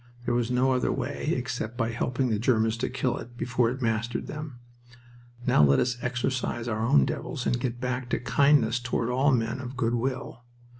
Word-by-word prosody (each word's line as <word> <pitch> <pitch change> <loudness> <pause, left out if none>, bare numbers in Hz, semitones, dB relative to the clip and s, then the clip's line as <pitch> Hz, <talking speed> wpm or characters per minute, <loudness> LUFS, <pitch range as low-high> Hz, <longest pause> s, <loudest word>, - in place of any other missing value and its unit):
There - - 0
was 120 -1 +1
no 125 +2 +2
other 130 -1 +1
way, 140 +4 -2
except 125 -2 -4
by 115 -2 0
helping 125 +2 -1
the 105 - +1
Germans 110 -1 +2
to 120 - -2
kill 125 -1 -1
it 120 +1 -11
before 120 -1 +1
it 130 +2 -4
mastered 115 +1 -1
them. 150 -4 -7 0.9
Now - - +4
let 70 -1 +5
us 125 0 0
exorcise 125 -1 -2
our 110 -1 -1
own 70 - +5
devils - - -4
and 120 - +1
get 120 -1 -3
back 125 0 -3
to - - 0
kindness 140 -3 +3
toward 120 -1 -1
all 135 +3 +3
men 115 -1 0
of 130 0 -7
good 115 -1 +1
will. 130 0 -3
120 Hz, 195 wpm, -27 LUFS, 115-130 Hz, 0.9 s, let